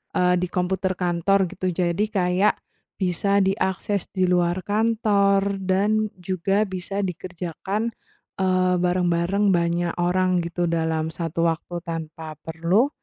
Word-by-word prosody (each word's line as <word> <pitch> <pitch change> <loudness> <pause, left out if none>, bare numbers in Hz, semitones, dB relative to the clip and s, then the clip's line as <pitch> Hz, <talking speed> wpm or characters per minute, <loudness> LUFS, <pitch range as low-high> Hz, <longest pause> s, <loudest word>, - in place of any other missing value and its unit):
eee, 180 0 +3
di 180 - -1
komputer 185 +1 -1
kantor, 180 +2 +2
gitu. 185 -1 -3
Jadi, 180 +4 0
kayak 185 -1 +2 0.4
bisa 200 +2 +1
diakses 190 0 -1
di 185 -2 +1
luar 175 0 +2
kantor 205 -2 +2
dan 210 +3 +1
juga 190 +3 0
bisa 190 +2 -4
dikerjakan, 185 +4 -3 0.5
eee, 185 -1 +2
bareng-bareng 180 +2 +2
banyak 170 0 0
orang 180 0 +1
gitu 170 +1 -2
dalam 160 -1 0
satu 165 0 -1
waktu 170 +1 -3
tanpa 160 -1 -6
perlu 170 - +1
180 Hz, 120 wpm, -23 LUFS, 175-195 Hz, 0.5 s, eee